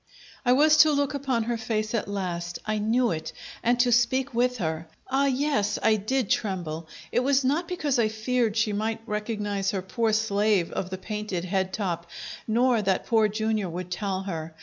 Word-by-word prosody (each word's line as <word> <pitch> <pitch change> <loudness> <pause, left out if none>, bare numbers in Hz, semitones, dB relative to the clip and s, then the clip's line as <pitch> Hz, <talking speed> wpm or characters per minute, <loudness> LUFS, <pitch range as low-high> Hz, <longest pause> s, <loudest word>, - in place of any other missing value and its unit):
I 245 -1 +4
was 305 +3 +5
to 310 0 +7
look 285 -1 +1
upon 265 -5 0
her 235 +1 -1
face 215 -1 -2
at 230 - -1
last 175 -3 -3
I 215 0 -1
knew 235 +3 +2
it 160 -1 -4 0.3
and 240 +1 +2
to 245 0 +2
speak 250 +3 +2
with 250 +1 +1
her. 160 -3 -3 0.2
Ah, 275 +1 +3
yes, 265 -6 +1
I 220 - +5
did 235 +3 -1
tremble! 170 -7 -2 0.2
It - - +2
was 270 +2 +2
not 300 +7 +1
because 300 -8 0
I 225 - +4
feared 220 +1 0
she 220 -1 +2
might 220 +2 -2
recognize 210 -2 -2
her 190 -2 -2
poor 225 +4 0
slave 210 -4 +2
of 185 - -3
the 190 - -4
painted 205 -2 -4
head 190 0 0
top, 170 -4 -3 0.4
nor 235 +1 +3
that 195 -2 0
Poor 220 -2 +3
Jr. 215 -1 -1
would 180 +1 -6
tell 190 0 -2
her. 165 -4 -5
215 Hz, 190 wpm, -26 LUFS, 190-245 Hz, 0.4 s, to